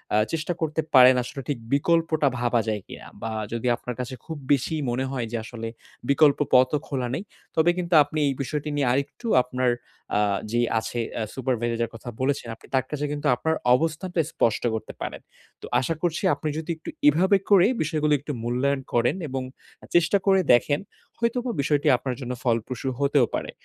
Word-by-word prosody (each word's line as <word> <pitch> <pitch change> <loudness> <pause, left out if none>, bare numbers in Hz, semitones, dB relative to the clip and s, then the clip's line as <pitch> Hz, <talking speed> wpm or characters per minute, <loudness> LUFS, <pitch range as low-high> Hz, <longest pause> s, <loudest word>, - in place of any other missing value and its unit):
আ - - +5 0.2
চেষ্টা 165 +2 -1
করতে 160 0 0
পারেন 130 0 +9
আসলে 135 +3 -7
ঠিক 140 - 0 0.2
বিকল্পটা 160 0 +2
ভাবা 120 -1 +2
যায় 105 -2 -1
কিনা। - - -10
বা 115 - -3 0.2
যদি 115 +1 -2
আপনার 125 +1 -6
কাছে 125 +1 -4
খুব 160 -2 -6 0.2
বেশি 140 +3 0
মনে 125 +2 -1
হয় 125 -3 -2
যে, 120 - -1
আসলে 115 0 -6 0.4
বিকল্প 140 0 +5
পথও 130 +3 +5
খোলা 130 -3 -2
নেই। 180 - -4 0.3
তবে 160 +2 +4
কিন্তু 175 -1 -2
আপনি 150 +2 -4
এই 140 - +1
বিষয়টি 150 +2 -3
নিয়ে 140 -3 +1
আরেকটু 140 - -2 0.2
আপনার 125 0 0 0.5
আ - - +3 0.3
যেই 120 +1 +2
আছে 120 +2 -4
এ্যা 115 - -3
সুপারভাইজার 120 -3 -1
এর - - -11
কথা 115 +2 -8
বলেছেন 135 -2 0
আপনি - - -19
তার 130 -1 +2
কাছে 150 -1 -2
কিন্তু 145 0 -2
আপনার 160 +6 0 0.2
অবস্থানটা 165 +4 -1
স্পষ্ট 115 - +1
করতে 110 - -5
পারেন। - - -5 0.4
তো - - -7
আশা 150 +6 -1
করছি 175 0 -1
আপনি 155 - -3
যদি 160 +2 -3
একটু 160 - -9 0.2
এভাবে 185 +7 +5
করে 195 -2 +6
বিষয়গুলো 155 -1 +1
একটু 145 +2 -6
মূল্যায়ন 130 +4 0
করেন 120 +5 +2
এবং 130 0 -2 0.5
চেষ্টা 175 +3 +4
করে 195 -1 +5
দেখেন, 145 +5 +3 0.4
হয়তোবা 240 +1 0
বিষয়টি 145 +1 +1
আপনার 125 +1 -4
জন্য 125 -1 -4
ফলপ্রসূ 120 +2 -1
হতেও 140 -2 +3
পারে। - - -4
140 Hz, 185 wpm, -25 LUFS, 125-160 Hz, 0.5 s, পারেন